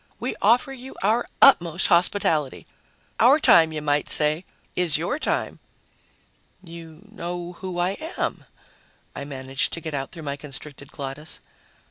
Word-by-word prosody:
We - - -2
offer 240 +6 +3
you 265 0 -10
our 225 +4 +2 0.2
utmost 175 - +5
hospitality. 170 -5 +2 0.5
Our 265 +7 +6
time, 160 - +6
you 155 -1 -5
might 145 -1 0
say, 155 +4 +3 0.3
is 175 -5 +1
your 175 - -2
time." - - -2 1.0
"You 165 -2 -11
know 175 -3 -5
who 185 -2 -5
I 175 +1 +1 0.3
am," - - -2 0.7
I 140 - -5
managed 135 -1 -2
to - - -3
get 160 -2 -6
out 135 -1 -3
through 165 -3 -9
my 140 -1 -4
constricted 140 0 -10
glottis. 140 +2 -6
165 Hz, 140 wpm, -24 LUFS, 150-185 Hz, 1.0 s, Our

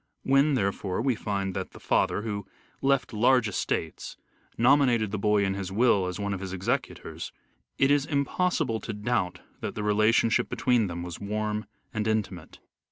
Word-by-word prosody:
When, 140 +2 +4
therefore, 100 -4 -1
we 130 +3 +2
find 100 -3 -2
that - - -4
the - - -12
father, 105 - +1
who 100 -3 -4 0.3
left 135 -3 +1
large 125 +2 +4
estates, 85 -5 -3 0.4
nominated 120 -4 +4
the 105 - -2
boy 105 0 +3
in 95 - 0
his 95 -1 -4
will 105 -3 +3
as 90 +1 -4
one 100 0 -1
of 95 - -4
his 95 -1 -6
executors, 95 0 -3 0.5
it 135 +1 +4
is 145 -1 +3
impossible 145 -3 0
to 110 - -5
doubt 105 -4 -1 0.2
that - - -5
the 105 - -3
relationship 110 +2 +3
between 120 -4 +2
them 85 -1 -5
was 85 -2 -7
warm 105 +1 -2 0.3
and 110 -2 -1
intimate. 100 -6 -2
105 Hz, 165 wpm, -27 LUFS, 100-125 Hz, 0.5 s, When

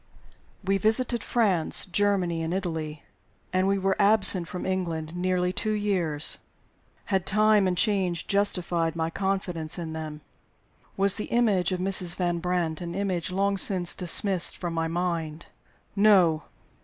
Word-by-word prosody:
WE 195 +1 0
visited 230 +2 0
France, 195 -9 +4
Germany, 185 -3 -1
and 165 +2 -3
Italy; 160 -5 -5 0.5
and 185 +1 +1
we 195 0 +1
were 195 0 -1
absent 200 -4 +5
from 180 - -7
England 170 -4 -4
nearly 180 0 -1
two 215 +3 -3
years. 180 -8 0 0.7
Had 190 -2 0
time 210 -1 +3
and 180 -1 -2
change 185 -5 -1
justified 175 -5 0
my 165 0 -3
confidence 180 -4 -3
in 165 -2 -6
them? 155 -1 -7 0.8
Was 195 +1 +1
the 210 - -4
image 205 -7 0
of 185 - -3
Mrs. 180 -2 +4
Van 175 -2 -2
Brandt 175 -2 -2
an 170 -1 -6
image 190 -4 -3
long 195 +2 -1
since 180 -3 +1
dismissed 185 +1 +2
from 175 -2 -5
my 165 0 -2
mind? 165 -2 -4 0.5
No! 185 -7 +3
180 Hz, 145 wpm, -25 LUFS, 170-195 Hz, 0.8 s, absent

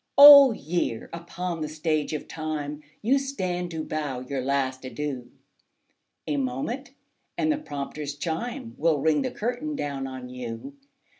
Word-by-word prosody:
Old 280 -4 +11
Year! 150 -7 -2
upon 170 0 -4
the 155 - -1
Stage 155 0 -1
of 150 - -4
Time 155 -2 -4 0.2
You 265 +6 +4
stand 185 -11 -3
to 160 -2 -4
bow 145 -6 -3
your 130 +1 -3
last 130 -1 -1
adieu; 130 -2 -4 1.0
A 150 -2 -1
moment, 225 - -3 0.4
and 315 -1 +2
the 300 - 0
prompter's 145 - -5
chime 230 - -4
Will 160 -2 +3
ring 155 +1 +2
the 260 - -1
curtain 250 +7 -3
down 140 - -3
on 130 -1 -7
you. 125 - -7
155 Hz, 145 wpm, -26 LUFS, 140-230 Hz, 1.0 s, Old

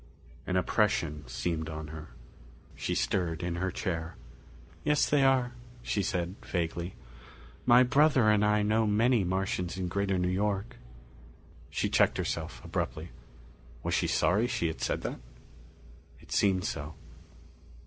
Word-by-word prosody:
An 90 - -1
oppression 90 - +1
seemed 80 +5 -2
on 80 -1 -6
her. 80 -1 -8 0.6
She - - -3
stirred 85 -4 0
in 85 0 -2
her 95 +1 0
chair. 85 -4 -3 0.7
"Yes 150 0 +3
they 145 -2 +3
are," 130 -2 +3 0.3
she 100 - 0
said 90 0 -2
vaguely. 85 0 -3 0.7
"My 125 +1 +8
brother 135 -2 +4
and 105 -1 +4
I 105 0 +3
know 110 +1 +2
many 110 +2 +3
Martians 95 -1 -1
in 95 -1 -2
Greater 100 +1 0
New 90 - +1
York." 100 +3 -1 0.9
She - - -1
checked - - +3
herself - - -4
abruptly. 80 +3 -3 0.7
Was - - -1
she - - +2
sorry 105 +7 +2
she 100 - -1
had 70 -7 -7
said - - -1
that? - - -4 1.0
It - - -18
seemed 95 -2 +2
so. 75 +2 -4
95 Hz, 140 wpm, -30 LUFS, 85-110 Hz, 1.0 s, My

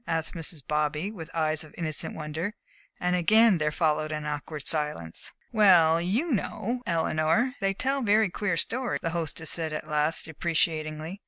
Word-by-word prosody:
asked 165 -1 -1
Mrs. 165 -3 -4
Bobby, 150 +5 -1
with 165 -7 -9
eyes 155 -1 0
of 155 - -15
innocent 155 -3 0
wonder, 160 +6 -4 0.4
and 180 0 +1
again 215 +2 +5
there 150 0 +1
followed 155 -1 0
an 150 -1 -4
awkward 150 0 -5
silence. 150 - -1 0.2
"Well, 175 -7 +5
you 230 - 0
know, 235 +2 -2
Eleanor, 165 +7 +1
they 195 0 0
tell 270 +5 0
very 215 -3 +3
queer 190 -3 -1
stories," 245 +8 -1
the 165 - -2
hostess 160 -1 -1
said 160 -2 -1
at 155 - -5
last, 150 +1 +1
deprecatingly. 160 +1 -2
165 Hz, 160 wpm, -27 LUFS, 155-195 Hz, 0.4 s, again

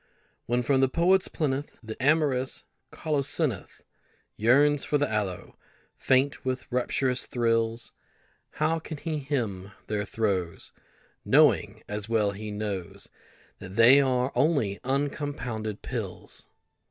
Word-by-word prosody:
When 120 +1 +1
from 135 +2 +2
the 135 - +3
poet's 180 +5 +3
plinth 145 -3 -3
The 110 0 -6
amorous 135 -3 +1 0.3
colocynth 145 - -2 0.5
Yearns 140 +6 +4
for 145 - +1
the 145 0 +1
aloe, 100 -4 -4 0.4
faint 135 +2 +1
with 130 0 -2
rapturous 125 +1 0
thrills, 115 -2 0 0.6
How 160 +2 0
can 160 -1 -7
he 155 0 -3
hymn 110 -9 -3
their 105 -1 -2
throes 100 -5 -2 0.5
Knowing, - - +3
as 105 +1 -5
well 110 -3 +2
he 105 +2 -7
knows, 105 -4 -5 0.5
That 95 -1 -9
they 125 +5 +7
are 130 -1 +1
only 140 -11 +1
uncompounded 135 -5 -3
pills? - - -6
125 Hz, 115 wpm, -27 LUFS, 105-145 Hz, 0.6 s, they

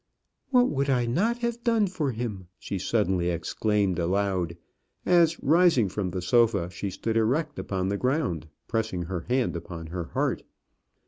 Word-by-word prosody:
"What 250 -2 +5
would 140 0 0
I 125 -3 +2
not 200 - +1
have 235 0 -3
done 230 -3 +3
for 175 -8 -2
him!" 110 -6 -5
she 100 - -4
suddenly 95 -4 +1
exclaimed 95 +2 0
aloud, 90 -1 0 0.5
as, 170 -2 +4
rising 160 - +4
from 95 0 -2
the 90 0 -4
sofa, 105 -4 +3
she 95 +3 -4
stood 110 +4 -2
erect 145 +7 0
upon 95 -1 -2
the 100 - 0
ground, 125 - 0 0.2
pressing 110 -6 -1
her 85 0 -5
hand 125 0 +1
upon 85 -3 -6
her 90 -2 -3
heart. - - -1
110 Hz, 155 wpm, -27 LUFS, 90-145 Hz, 0.5 s, What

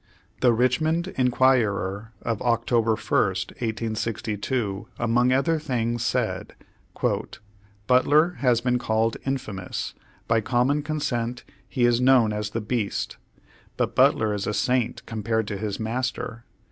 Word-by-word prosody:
The 125 - +5
Richynond 155 +9 +1
Inquirer 115 -5 +1
of 115 -2 -1
Oct. 115 -1 0
1, 120 -2 +4
1862, 110 0 -1
among 120 +2 +2
other 155 +5 +2
things, 120 -5 -1
said: - - -1 1.3
"Butler 145 +7 +4
has 125 -3 +3
been 125 0 +1
called 110 -1 0
infamous; 105 -9 -3 0.3
by 115 -1 +3
common 130 +5 +1
consent 125 -6 -2 0.3
he 125 -3 +1
is 120 0 +3
known 125 -4 +5
as 105 0 -2
the 115 +2 -3
beast. 105 -1 -2 0.6
But - - 0
Butler 110 -1 +4
is 100 -1 -3
a 105 - -1
saint 125 +2 0
compared 110 -1 -1
to 100 - -3
his 105 -1 -3
master. 120 0 -3
115 Hz, 120 wpm, -25 LUFS, 110-125 Hz, 1.3 s, The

